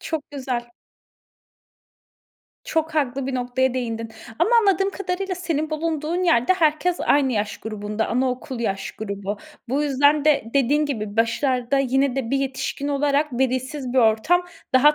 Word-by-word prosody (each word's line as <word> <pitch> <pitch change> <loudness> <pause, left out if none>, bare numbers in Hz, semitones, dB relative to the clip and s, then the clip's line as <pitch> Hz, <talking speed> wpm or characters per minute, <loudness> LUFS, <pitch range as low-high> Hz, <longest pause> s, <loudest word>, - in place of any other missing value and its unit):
Çok 315 -3 -4
güzel. 255 -4 -4 1.9
Çok 320 0 -1
haklı 275 -3 0
bir 270 - -2
noktaya 250 +1 0
değindin. 230 -3 -3 0.3
Ama - - +3
anladığım 390 -3 +3
kadarıyla 385 0 -3
senin 320 -4 -2
bulunduğun 315 +2 -1
yerde 330 -3 +4
herkes 340 +1 +1
aynı 280 -2 +3
yaş 210 -1 -2
grubunda, 210 0 -3
anaokul 255 0 -1
yaş 195 -4 -2
grubu. 200 -1 -4 0.3
Bu 275 +4 +1
yüzden 285 +1 +3
de 300 -6 +3
dediğin 285 +3 +3
gibi, 215 -7 -4
başlarda 250 +3 +1
yine 270 0 +1
de 245 -4 -2
bir 275 - +2
yetişkin 275 +1 -3
olarak, 290 +1 +1
velisiz 260 +1 -1
bir 260 - +2
ortam 245 +11 +3 0.3
daha 295 +4 +6
270 Hz, 140 wpm, -23 LUFS, 240-305 Hz, 1.9 s, daha